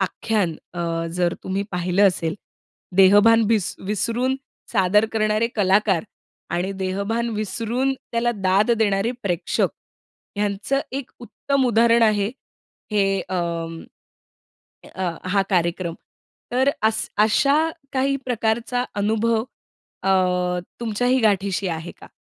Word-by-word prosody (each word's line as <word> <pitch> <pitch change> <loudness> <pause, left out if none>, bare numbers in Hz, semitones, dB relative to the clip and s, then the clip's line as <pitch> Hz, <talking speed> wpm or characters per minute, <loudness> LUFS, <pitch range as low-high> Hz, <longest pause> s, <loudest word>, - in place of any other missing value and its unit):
आख्यान 195 -2 0 0.2
अ, 165 -1 -2
जर 175 -1 +1
तुम्ही 195 +1 -1
पाहिलं 180 +3 +3
असेल, 165 -3 -2 0.6
देहभान 205 +4 +6
विस 215 -5 +1
विसरून, 230 +6 0 0.4
सादर 205 +1 +4
करणारे 215 +1 +1
कलाकार 195 -2 +3 0.5
आणि 180 +3 -1
देहभान 200 +5 -1
विसरून 235 +5 -1 0.2
त्याला 235 +1 +1
दाद 195 +3 +2
देणारे 205 +1 +1
प्रेक्षक, 175 -4 0 0.7
ह्यांचं 210 +7 0
एक 275 -1 -5
उत्तम 265 +2 -1
उदाहरण 235 0 +4
आहे, 210 -2 +3 0.6
हे 195 -2 +2
अं, 170 -2 -3 1.1
अ, 185 -2 -1 0.2
हा 195 0 +3
कार्यक्रम. 170 -1 0 0.6
तर 260 +3 +3
अस 220 0 +1
अशा 275 +7 +4 0.4
काही 275 +1 +1
प्रकारचा 235 +1 0
अनुभव 220 +3 +1 0.7
अ, 180 -2 +1 0.2
तुमच्याही 245 +3 +1
गाठीशी 200 -3 +1
आहे 165 +1 -4
का? - - -12
205 Hz, 110 wpm, -22 LUFS, 185-230 Hz, 1.1 s, देहभान